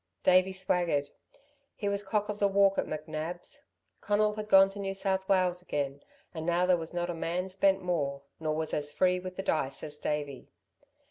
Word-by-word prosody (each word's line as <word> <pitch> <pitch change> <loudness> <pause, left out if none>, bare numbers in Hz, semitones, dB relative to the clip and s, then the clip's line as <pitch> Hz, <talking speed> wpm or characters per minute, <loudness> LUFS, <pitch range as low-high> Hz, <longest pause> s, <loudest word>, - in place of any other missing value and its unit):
Davey 185 +1 +5
swaggered. 175 -6 0 0.6
He 205 - -3
was 200 0 0
cock 210 +1 0
of 210 0 -4
the 200 - +4
walk 195 0 +3
at - - -1
McNab's. 155 +3 -6 0.3
Conal 210 0 +2
had 215 0 -6
gone 195 0 +7
to 200 - -9
New 195 -1 -3
South 190 0 -1
Wales 180 -2 +2
again, 145 -4 -3 0.3
and 160 -2 -5
now 175 +2 +2
there 180 0 +4
was 165 -1 -5
not 175 0 -2
a - - -4
man 175 +3 -2
spent 195 0 +2
more, 140 -6 -1 0.2
nor 155 -1 -1
was 160 0 -3
as 145 0 -1
free 180 +4 +2
with 185 0 -7
the 190 - -4
dice 140 -6 -1
as 150 -1 -5
Davey. 145 -3 -3
180 Hz, 195 wpm, -30 LUFS, 155-195 Hz, 0.6 s, gone